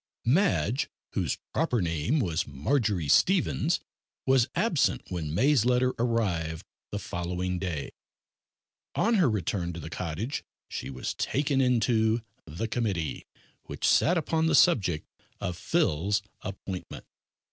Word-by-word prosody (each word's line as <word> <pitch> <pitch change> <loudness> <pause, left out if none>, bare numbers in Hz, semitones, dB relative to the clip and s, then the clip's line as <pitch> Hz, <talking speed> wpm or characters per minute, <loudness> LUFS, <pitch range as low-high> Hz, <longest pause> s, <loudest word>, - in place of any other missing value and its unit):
Madge 145 - +2 0.2
whose - - 0 0.2
proper 140 -7 +1
name 85 - 0
was 85 - 0
Marjory 95 - 0
Stevens 175 - +3 0.5
was 130 -3 +4
absent - - +2
when 80 -4 -3
May's 130 - +3
letter 125 +1 +2
arrived 95 -10 0 0.2
the - - -3
following 90 +1 -3
day. 85 -7 -3 1.0
On 230 - +2
her 175 -9 +4
return 90 -4 -1
to 85 - -6
the 80 +1 -8
cottage 90 - -3 0.2
she 65 - -5
was 65 -1 -4
taken 140 -1 0
into 115 -2 +2 0.2
the 85 +9 -3
committee 100 - -2 0.4
which - - -2
sat 175 - +4
upon 160 +1 +1
the - - +3
subject 95 - +3 0.3
of 90 - -3
Phil's 95 +4 +1 0.2
appointment. 95 -1 -6
105 Hz, 125 wpm, -28 LUFS, 85-130 Hz, 1.0 s, was